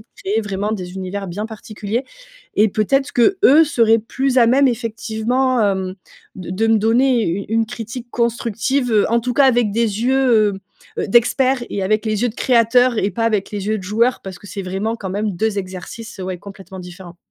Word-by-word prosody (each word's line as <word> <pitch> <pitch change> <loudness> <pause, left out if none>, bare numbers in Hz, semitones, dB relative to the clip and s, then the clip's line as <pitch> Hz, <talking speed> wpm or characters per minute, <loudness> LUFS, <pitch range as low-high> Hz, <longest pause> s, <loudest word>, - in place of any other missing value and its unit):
de 215 - -17 0.2
créer 210 +3 0
vraiment 205 +1 -3
des 180 -3 -5
univers 190 +1 -5
bien 205 +5 -4
particuliers. 220 +2 -5 0.5
Et 215 +1 +4
peut-être 265 +7 0
qu'eux 310 +3 +5
seraient 230 -6 +3
plus 260 +4 -2
à 235 - +6
même, 265 +3 +4
effectivement, 230 0 0
mmh, 185 -1 -4 0.4
de 185 -2 -8
de - - +4
me 225 -1 +4
donner 235 +3 +2
une 195 +2 -2 0.2
une - - -3
critique 240 +1 -7
constructive, 235 0 0
en 235 +1 +2
tout 250 +1 -2
cas, 275 - +4
avec 240 -5 +2
des 225 -1 -1
yeux, 245 -6 +3 0.5
heu, - - -1
d'experts 250 +3 +3
et 200 - -3
avec 215 +3 0
les 215 +1 -1
yeux 245 - +2
de 220 - -8
créateurs 245 0 +3
et 205 - 0
pas 225 +5 -2
avec 215 -3 0
les 205 -1 -5
yeux 215 0 0
de - - -9
joueurs. 230 +6 +1
Parce 190 -2 -9
que 205 - -15
c'est 195 +1 -6
vraiment 195 +5 -3
quand 190 -4 -6
même 205 +1 -2
2 205 +3 -1
exercices, 190 +4 -8
ouais, 185 -1 -5
complètement 195 -1 -11
différents. 180 -1 -11
220 Hz, 195 wpm, -19 LUFS, 200-240 Hz, 0.5 s, à